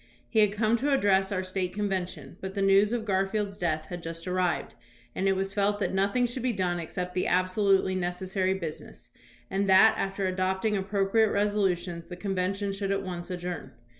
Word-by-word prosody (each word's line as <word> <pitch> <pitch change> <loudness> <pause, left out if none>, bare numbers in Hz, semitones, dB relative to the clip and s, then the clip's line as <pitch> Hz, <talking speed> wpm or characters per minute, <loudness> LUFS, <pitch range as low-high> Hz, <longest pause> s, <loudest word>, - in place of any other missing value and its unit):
He 225 - +1
had 210 -2 +5
come 215 +2 +2
to 285 +5 0
address 195 -7 +3
our 185 -1 -1
State 185 -1 -2
convention, 185 -8 -3
but 190 +1 -6
the 200 - -1
news 195 +2 +5
of 235 -2 -2
Garfield's 200 +1 0
death 155 -3 -1
had 175 +2 -7
just 165 +1 -6
arrived, 180 -1 0 0.4
and 195 - -1
it 195 - +4
was 195 +1 -2
felt 205 0 +1
that 205 - -1
nothing 200 +6 +2
should 245 +1 -4
be 250 0 0
done 180 -3 -1
except 180 +2 -4
the 185 - 0
absolutely 190 +1 +2
necessary 185 +1 -1
business, 165 -5 -8 0.4
and 195 +1 0
that, 195 +4 +7
after 195 0 -1
adopting 190 +3 0
appro 195 0 0
priate 220 +1 +3
resolutions, 190 -4 0
the 180 - -7
convention 195 +1 -2
should 195 0 -3
at 195 0 0
once 175 -1 -6
ad 180 -1 -4
journ. 175 -2 -5
195 Hz, 195 wpm, -28 LUFS, 180-205 Hz, 0.4 s, that